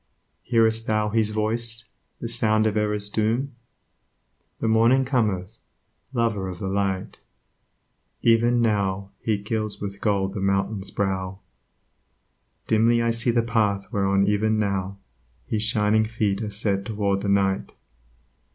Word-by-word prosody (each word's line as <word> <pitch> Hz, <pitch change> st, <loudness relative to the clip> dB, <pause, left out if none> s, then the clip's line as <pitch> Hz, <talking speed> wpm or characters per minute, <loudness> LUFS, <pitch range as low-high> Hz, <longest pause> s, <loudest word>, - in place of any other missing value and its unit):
Hear'st 115 Hz, -1 st, +1 dB
thou 110 Hz, -1 st, +1 dB
his 110 Hz, 0 st, +1 dB
voice, 115 Hz, +2 st, -1 dB, 0.3 s
the 115 Hz, -, -4 dB
sound 110 Hz, -2 st, +2 dB
of 110 Hz, -1 st, +1 dB
error's 105 Hz, -1 st, +1 dB
doom? 115 Hz, +6 st, 0 dB, 1.1 s
The -, -, -1 dB
Morning 115 Hz, +4 st, +4 dB
cometh, 110 Hz, -6 st, -1 dB, 0.5 s
lover 115 Hz, -6 st, 0 dB
of 90 Hz, -, -6 dB
the 95 Hz, +1 st, -4 dB
Light; 95 Hz, -1 st, -2 dB, 1.0 s
Even 120 Hz, +1 st, +4 dB
now 100 Hz, -3 st, 0 dB
He 110 Hz, -2 st, 0 dB
gilds 105 Hz, +1 st, -3 dB
with 100 Hz, 0 st, -6 dB
gold 100 Hz, -2 st, 0 dB
the 105 Hz, -, -4 dB
mountain's 100 Hz, +1 st, 0 dB
brow, 95 Hz, -1 st, -2 dB, 1.3 s
Dimly 115 Hz, +2 st, +3 dB
I 115 Hz, 0 st, +1 dB
see 115 Hz, +1 st, +1 dB
the 115 Hz, 0 st, +2 dB
path 105 Hz, -2 st, 0 dB
whereon 100 Hz, -1 st, +2 dB
even 105 Hz, +2 st, +1 dB
now 100 Hz, -2 st, -1 dB, 0.5 s
His 110 Hz, -, -2 dB
shining 110 Hz, -1 st, +2 dB
feet 110 Hz, -3 st, -1 dB
are 110 Hz, -, -3 dB
set 100 Hz, -1 st, 0 dB
toward 100 Hz, -2 st, -1 dB
the 100 Hz, -, -2 dB
Night. 95 Hz, -1 st, +1 dB
105 Hz, 135 wpm, -24 LUFS, 100-115 Hz, 1.3 s, Morning